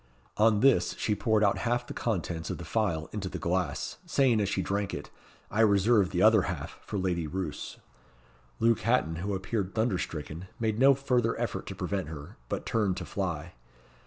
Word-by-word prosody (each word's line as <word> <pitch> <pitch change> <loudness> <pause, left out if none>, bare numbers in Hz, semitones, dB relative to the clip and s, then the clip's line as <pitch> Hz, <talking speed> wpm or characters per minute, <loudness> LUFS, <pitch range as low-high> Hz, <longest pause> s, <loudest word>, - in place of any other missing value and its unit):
On 110 -1 +4
this 105 -10 +4
she 105 - 0
poured 110 0 +2
out 100 - +3
half 120 +1 0
the - - -7
contents 85 -7 -2
of - - -3
the 85 - -8
phial 80 -5 0
into 100 -3 -4
the - - -5
glass, 90 +1 -2
saying 125 -6 +3
as 100 - 0
she 95 - 0
drank 100 +1 -1
it, - - -8 0.4
"I 110 - +2
reserve 100 -1 +4
the 90 0 +1
other 110 -1 +7
half 80 -6 -5
for 105 - -5
Lady 90 -4 -1
Roos." 85 -2 -4 0.8
Luke 115 -1 +3
Hatton, 105 -9 +1
who 100 +3 -2
appeared 95 0 -3
thunder 110 -4 +1
stricken, 80 +2 -5
made 110 -1 0
no 135 +1 +7
further 125 -4 +1
effort - - -3
to - - -5
prevent 95 -5 -2
her, 75 -2 -8
but - - -3
turned 105 -5 +1
to 90 - -4
fly. 85 -4 -3
100 Hz, 190 wpm, -29 LUFS, 90-110 Hz, 0.8 s, other